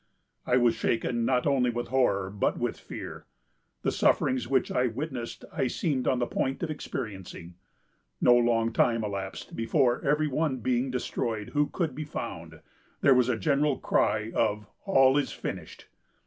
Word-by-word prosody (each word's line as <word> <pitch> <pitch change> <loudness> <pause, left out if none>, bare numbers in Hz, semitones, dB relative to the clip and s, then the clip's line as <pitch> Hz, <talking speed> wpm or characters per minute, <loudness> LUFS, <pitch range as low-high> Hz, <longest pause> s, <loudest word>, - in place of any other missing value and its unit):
I 125 - +4
was 120 -2 +4
shaken 115 +1 0
not 125 0 +1
only 135 -4 +3
with 120 0 -3
horror, 100 -8 +1
but 100 - 0
with - - -2
fear. - - -8 0.6
The - - +1
sufferings 130 -1 +2
which 130 -2 +1
I 125 0 +2
witnessed 125 0 -5
I 130 - 0
seemed 135 -1 -1
on 130 - +3
the 120 - +1
point 135 +6 -2
of 160 - -1
experiencing. 95 - -6 0.7
No 120 - +6
long 115 -1 +2
time 115 -1 +2
elapsed 100 -2 -5
before 120 +2 +1
every 150 +2 +2
one 145 -1 0
being 125 +2 0
destroyed 115 -4 -3
who 145 0 +1
could 165 -4 -2
be 155 - -5
found, 145 - -7 0.4
there 140 - +6
was 125 -1 +3
a 120 - +1
general 140 +6 +1
cry 110 +1 +1
of 105 -2 0 0.2
'All 135 -7 +5
is 145 - -2
finished. - - -7
125 Hz, 160 wpm, -28 LUFS, 115-135 Hz, 0.7 s, No